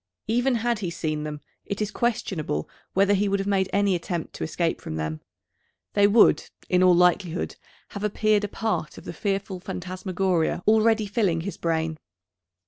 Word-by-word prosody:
Even 245 +3 +2
had 235 -1 0
he 185 -4 -2
seen 155 -2 -3
them 150 -1 -5 0.2
it 200 - -4
is 210 -1 -1
questionable 185 - -1 0.3
whether 200 +1 +4
he 200 +1 +2
would 200 - +2
have 195 - -2
made 190 -2 +1
any 200 -1 +2
attempt 170 -1 -3
to - - -5
escape 165 +1 -1
from 80 - -5
them. 80 0 -3 0.7
They 205 0 +5
would, 215 +2 +5 0.2
in 180 0 +3
all 180 -1 +6
likelihood, 180 0 +2 0.3
have 200 -1 -7
appeared 210 0 +2
a - - 0
part 215 -6 -2
of - - -10
the - - -6
fearful 195 0 -2
phantasmagoria 185 -1 -1
already 220 0 +4
filling 195 -5 +1
his 200 +4 -5
brain. 160 -1 -1
190 Hz, 170 wpm, -25 LUFS, 170-210 Hz, 0.7 s, all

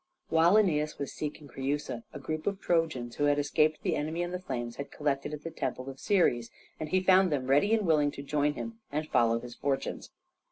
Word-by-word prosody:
While 165 +4 +5
Æneas 155 -8 +2
was 140 - -4
seeking 150 -1 -5
Creusa 135 -2 -3
a - - -7
group 155 +3 -4
of 200 -1 0
Trojans 160 -11 0
who 145 - +2
had 145 0 +3
escaped 150 +2 +2
the - - +1
enemy 160 +3 -2
and 175 +1 -4
the 180 - -2
flames 120 -8 -4
had 140 - -5
collected 145 -1 -2
at 150 -1 -6
the 165 - -5
temple 130 -1 -3
of 135 - -14
Ceres, 120 - +2 0.3
and 155 - -4
he 185 +3 +2
found 185 -1 +5
them 135 -3 0
ready 145 +10 +3
and 215 -3 0
willing 150 -3 +3
to 140 - -7
join 145 +1 +1
him 230 -1 -6
and 155 +2 -2
follow 115 -4 +3
his 120 0 -9
fortunes. 135 +2 -2
150 Hz, 215 wpm, -30 LUFS, 135-165 Hz, 0.3 s, While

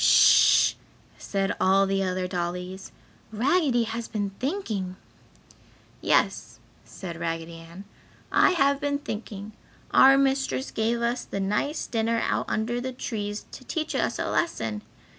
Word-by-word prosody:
"Sh!" - - +6 0.5
said 195 -1 -1
all 195 +1 +4
the 195 0 0
other 185 -1 -1
dollies, 180 +1 -4 0.4
"Raggedy 255 +2 +2
has 230 +1 -4
been 205 -3 -3
thinking!" 225 - -3 1.1
"Yes," - - +1 0.3
said 170 -3 -8
Raggedy 165 0 -4
Ann, 170 +4 -12 0.5
"I - - +5
have 280 -4 +2
been 285 -1 0
thinking; 210 -5 -7 0.4
our 270 +1 +7
mistress 270 0 0
gave 230 +2 0
us 240 +1 0
the 200 - -5
nice 210 +10 -1
dinner 230 0 0
out - - -1
under 235 +3 -1
the 260 +1 -4
trees 210 -4 -4
to - - -10
teach 310 +4 -3
us - - 0
a - - -2
lesson. 110 - -1
220 Hz, 135 wpm, -26 LUFS, 190-260 Hz, 1.1 s, our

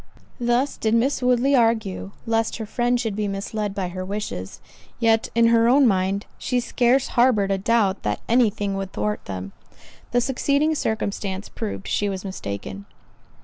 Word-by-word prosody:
Thus 240 +3 +1
did 220 0 +1
Miss 260 +4 +1
Woodley 250 +2 +3
argue, 225 -6 +1 0.2
lest 225 -1 0
her 220 - -4
friend 240 +3 0
should 225 -4 -2
be 210 0 -1
misled 200 +1 -3
by 190 -3 -2
her 185 +1 -5
wishes; 190 - -5 0.4
yet, 225 -1 +2
in 230 0 +5
her 230 0 +4
own 275 +2 +5
mind, 195 0 +1
she 250 - 0
scarce 245 +2 +2
harboured 235 -5 +3
a 195 - +1
doubt 205 -2 +2
that 105 0 -1
any 235 -1 +4
thing 205 -1 -3
would 195 -1 -4
thwart 210 0 -2
them. 95 0 -6 0.6
The 245 - +2
succeeding 280 +5 +1
circumstance 205 -6 -2
proved 210 -3 -5
she 205 - 0
was 190 0 -5
mistaken. 100 - -6
220 Hz, 165 wpm, -23 LUFS, 195-240 Hz, 0.6 s, in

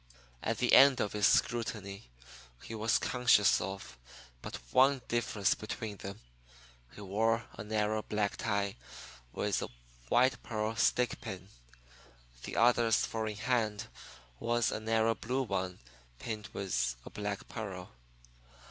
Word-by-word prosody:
At - - -1
the - - +1
end 135 -2 +8
of 105 - -1
his 105 -1 +4
scrutiny 110 - 0 0.5
he - - -8
was 110 0 +2
conscious 125 -5 +4
of 95 -10 -6 0.4
but - - -6 0.2
one 135 0 +4
difference 115 -4 +1
between 110 -1 -6
them. 100 +1 -7 0.8
One 105 -1 -8
wore 115 +4 +1
a - - -7
narrow 110 0 0
black 105 -1 -1
tie 100 -2 -1 0.5
with - - -1
a - - -3 0.4
white 130 +1 +3
pearl 110 0 -2
stickpin. 110 -5 0 1.0
The - - -6
other's 120 -1 +4
"four 110 -1 -3
in 105 -1 -4
hand" 110 -2 -1 0.5
was 120 0 +1
a - - -2
narrow 110 +1 +2
blue 125 +4 -2
one 95 -5 -2 0.4
pinned 110 - -5
with 65 -11 -1
a - - -9
black 105 -1 -4
pearl. 95 -5 -6
110 Hz, 130 wpm, -32 LUFS, 100-115 Hz, 1.0 s, end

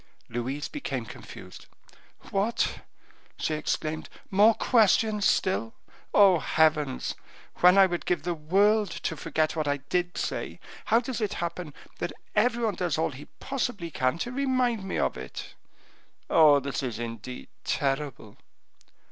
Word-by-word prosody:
Louise 130 +5 -3
became 135 - -4
confused. - - -11 0.6
"What," 205 +4 0 0.6
she 155 - -1
exclaimed, 155 +1 -2 0.2
"more 210 +3 +6
questions 215 -2 +3
still! 115 -12 +1 0.4
Oh, 195 -4 +6
heavens! 155 -4 +1 0.4
when 180 +2 +6
I 195 - +8
would 175 -2 -3
give 175 -4 0
the 175 +1 -1
world 200 +6 +3
to 165 - -4
forget 155 +1 -1
what 155 -2 -1
I 145 0 +1
did 175 +6 -2
say, - - -3 0.3
how 230 - +4
does 245 -2 -4
it 210 - -1
happen 170 -2 -4 0.3
that - - -3 0.2
every 235 +2 +2
one 215 - +1
does 175 -5 -1
all 160 0 0
he 140 +2 -10
possibly 245 -10 -3
can 130 +1 0
to 240 - -3
remind 255 -5 0
me 190 - -3
of - - 0
it? 65 -1 -8 0.8
Oh, 150 -3 +7
this 140 +2 -3
is 125 -5 -3
indeed 115 +1 -7
terrible!" 135 -6 -2
170 Hz, 140 wpm, -27 LUFS, 145-210 Hz, 0.8 s, I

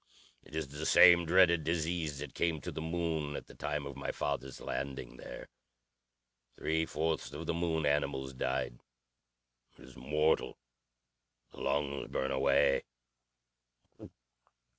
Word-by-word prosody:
It 75 - -12
is 80 -4 -2
the 75 +3 -4
same 85 -1 +7
dreaded 85 -2 +5
disease 80 -1 -1
that 75 +2 -7
came 85 -2 0
to - - -5
the - - -5
Moon 80 -3 -2
at - - -6
the - - -14
time 75 -1 -3
of 70 -1 -7
my 70 - -4
father's 70 -2 -3
landing 70 -1 -5
there. - - -9 1.1
Three 80 +1 0
fourths 80 0 -1
of 75 +3 -6
the 85 - 0
Moon 80 -2 0
animals 70 -2 0
died. - - -2 1.0
It - - -15
is 65 0 -14
mortal. 75 +4 +1 0.9
The - - -11
lungs 70 -1 -1
burn 65 - -2
away. 70 - +3
75 Hz, 135 wpm, -33 LUFS, 70-80 Hz, 1.1 s, same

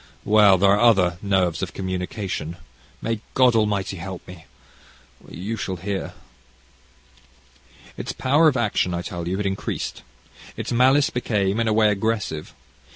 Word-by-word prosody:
well 105 -2 +6
there 100 +1 +4
are 100 - +3
other 95 -7 +4
nerves 95 -4 +1
of 95 - -4
communication. 95 -3 -4 0.5
May 115 -2 -2
God 125 -2 +5
Almighty 100 -3 0
help 90 +1 -8
me! 90 -3 -12 0.8
You 100 +7 -5
shall 95 -1 -3
hear. 95 +2 -4 1.8
"Its - - -5
power 145 +5 +3
of 140 -4 +2
action, 100 -6 0
I 85 - -3
tell 85 -1 -5
you, 95 +2 -1
had 105 - -2
increased. 95 0 -3 0.6
Its - - -4
malice 130 +4 +4
became, 105 -4 0
in 115 - +1
a 110 - +2
way, 110 -1 +4
aggressive. 105 -6 -2
100 Hz, 145 wpm, -23 LUFS, 90-110 Hz, 1.8 s, well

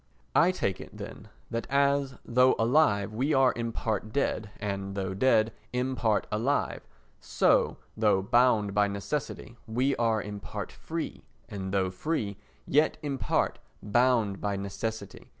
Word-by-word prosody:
I 170 - +6
take 170 - -1
it, - - -11
then, - - -9 0.2
that 115 0 -3
as, 140 -1 +2
though 125 +2 +4
alive, 115 -5 +3
we 135 +7 +1
are 135 -1 +5
in 115 -1 -3
part 110 -1 -2
dead 110 -4 -1
and, 100 -1 -3
though 95 -1 -2
dead, 110 +1 +3 0.2
in 125 +1 -1
part 110 -4 +1
alive, 120 +7 0 0.4
so, - - +2 0.2
though 105 -3 +3
bound 110 -2 +3
by 105 0 +3
necessity, 115 +3 -4
we 125 +5 +1
are 115 -2 +2
in 105 0 -6
part - - -6
free, - - -5 0.3
and, 95 -2 -5
though 95 -2 +1
free, 100 - -2 0.3
yet 150 +3 +3
in 140 -3 -3
part - - 0 0.2
bound 115 -2 +2
by 100 -1 -1
necessity. 100 +1 -5
110 Hz, 150 wpm, -28 LUFS, 100-130 Hz, 0.4 s, I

